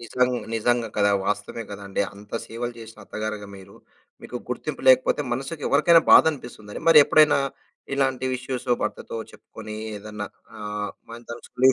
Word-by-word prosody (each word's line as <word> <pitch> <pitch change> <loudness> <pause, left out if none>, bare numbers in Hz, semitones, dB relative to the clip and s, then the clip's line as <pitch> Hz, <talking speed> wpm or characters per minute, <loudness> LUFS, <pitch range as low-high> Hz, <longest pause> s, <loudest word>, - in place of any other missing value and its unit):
నిజంగ్ 125 +2 0 0.2
నిజంగా 120 0 +1
కదా! 100 -1 +4 0.2
వాస్తవమే 105 +2 -2
కదండి. 100 0 -3
అంత 105 +1 -15
సేవలు 120 +1 -4
చేసిన 110 0 -12
అత్తగారుగా 110 -1 -5
మీరు 95 +1 -14 0.5
మీకు 125 - -6
గుర్తింపు 135 +4 -4
లేకపోతే 130 +3 +5
మనసుకి 135 +4 -4
ఎవరికైనా 165 +3 +6
బాధ - - +9
అనిపిస్తుందని. 115 -6 -9
మరి 160 -2 +9
ఎప్పుడైనా 150 -2 +5 0.6
ఇలాంటి 130 -1 0
ఇష్యూస్ 125 -1 -5
భర్తతో 105 +1 -4 0.2
చెప్పుకొని 110 -1 -10 0.2
ఏదన్నా 105 0 -6 0.3
ఆహ్, 105 -1 -4 0.2
మళ్ళీ 115 +1 -10
తలుచుకుని. 130 +2 +2
115 Hz, 140 wpm, -24 LUFS, 105-130 Hz, 0.6 s, బాధ